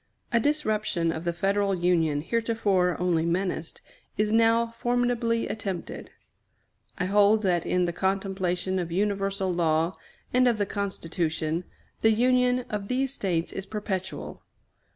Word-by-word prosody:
A 235 - +5
disruption 215 - 0
of 165 +1 -5
the 170 - +1
Federal 195 +3 +1
Union, 165 -4 +1
heretofore 205 -3 +1
only 175 -2 +1
menaced, 170 -1 -2 0.4
is 210 0 +1
now 230 +1 +3
formidably 240 -1 +1
attempted. 195 -5 -5 0.9
I 180 - -1
hold 205 +2 +4
that 175 -3 +1
in 180 0 +2
the 175 - -2
contemplation 190 -1 -1
of 170 -2 -4
universal 195 0 0
law 165 0 +1 0.4
and 255 0 +4
of 235 -2 +2
the 205 - +1
Constitution, 170 -4 -2 0.3
the 220 - +4
union 250 +1 +2
of 205 -2 -4
these 265 +2 0
States 175 -8 -1
is 195 0 -6
perpetual. 190 -3 -4
195 Hz, 130 wpm, -27 LUFS, 175-225 Hz, 0.9 s, A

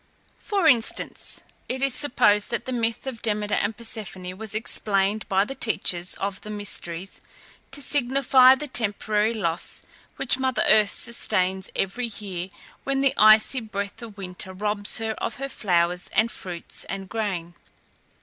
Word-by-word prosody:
For 395 -5 +1
instance, 240 -5 +1 0.3
it 260 +1 -2
is 275 -2 +2
supposed 210 -8 +2
that 235 - -3
the 260 - -4
myth 230 -1 -1
of 255 -4 -6
Demeter 210 -2 -1
and 215 - 0
Persephone 200 -5 -5
was 215 +1 -5
explained 210 -2 +2
by 195 0 +3
the 270 - -6
teachers 180 -8 -1
of 195 -1 -4
the 215 - -9
Mysteries 195 -3 -4 0.5
to 280 +1 -4
signify 260 -1 +5
the 295 +3 -6
temporary 215 -3 +1
loss 170 -6 -2 0.3
which 255 - +3
mother 260 -1 +1
earth 215 -1 +6
sustains 190 -5 -1
every 235 +6 -1
year 195 -4 -6 0.3
when 270 0 0
the 275 -1 +3
icy 215 +4 +6
breath 200 -1 -5
of 220 -3 -10
winter 185 -1 -5
robs 205 +1 -1
her 225 0 -2
of - - -3
her 275 0 -5
flowers 180 -5 +1
and 225 +2 +2
fruits 175 -2 -6
and 195 -1 -6
grain. 185 -6 -3
215 Hz, 150 wpm, -24 LUFS, 195-240 Hz, 0.5 s, earth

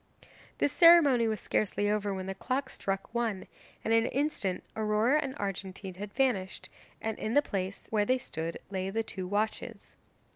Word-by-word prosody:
This 285 - +1
ceremony 310 -9 +7
was 220 -1 -1
scarcely 205 0 0
over 205 -1 0
when 190 -1 -4
the 195 - -3
clock 260 +7 -2
struck 195 +2 -3
one, 230 -5 -1 0.4
and 225 - +2
in 225 0 +5
an - - -2
instant 270 -10 -1
Aurora 220 +6 +2
and 270 -2 -4
Argentine 195 -2 -4
had 200 +3 -7
vanished, 220 -9 0 0.3
and 220 -1 -3
in 220 - -2
the 290 - +7
place 195 -3 -4
where 215 -2 +3
they 255 +4 +3
stood 165 -8 -5
lay 190 -1 -2
two 185 -4 -5
watches. 210 +3 -3
210 Hz, 170 wpm, -30 LUFS, 195-250 Hz, 0.4 s, ceremony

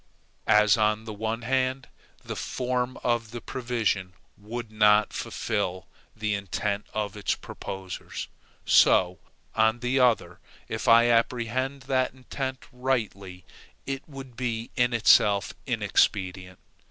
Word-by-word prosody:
As, 105 0 +5
on 110 0 +1
the 110 - -6
one 110 +2 -3
hand, 130 +1 0 0.4
the - - -5
form 125 0 -2
of 120 -2 0
the 120 +1 -6
provision 115 -8 -2 0.2
would 110 +2 -7
not 105 -1 +4
fulfil 95 -4 -3 0.3
the 110 -1 -1
intent 100 +1 -2
of 105 -1 -3
its 105 - -1
proposers, 95 -2 -7 0.4
so, 90 -1 +5 0.3
on 110 +2 +2
the 125 +2 +1
other, 125 -3 +2 0.3
if - - -4
I 115 +1 +7
apprehend 125 +3 0
that 130 -1 0
intent 130 0 -5
rightly, 110 -8 -3 0.4
it 135 +2 -5
would 135 -3 -10
be 115 -2 -3
in 125 -1 +2
itself 105 -3 +4
inexpedient. 95 -2 0
115 Hz, 120 wpm, -26 LUFS, 105-125 Hz, 0.4 s, I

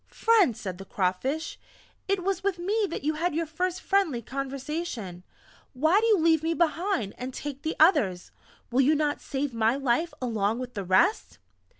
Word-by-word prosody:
"Friend," 420 - +3
said 185 -2 -6
the 195 - -8
Crawfish, 205 - -2 0.5
"it 390 -2 0
was 390 +1 -1
with 395 -2 0
me 405 +4 0
that - - -5
you 305 +2 +1
had 330 +1 -1
your 330 +1 0
first 360 +4 -3
friendly 385 -11 +1
conversation 270 - -5 0.5
why 315 +9 +3
do 455 - +1
you 435 -3 +5
leave 325 -2 +3
me 330 +1 -1
behind, 335 - 0
and 255 +2 -4
take 285 -2 -6
the 315 - -3
others? 205 - +3 0.4
Will 255 +3 +3
you 295 +4 +4
not 295 -1 0
save 275 -1 -3
my 230 +1 +2
life 275 +5 0
along 225 -3 0
with 250 0 -6
the 200 -4 -4
rest?" 260 - +2
295 Hz, 180 wpm, -27 LUFS, 240-345 Hz, 0.5 s, you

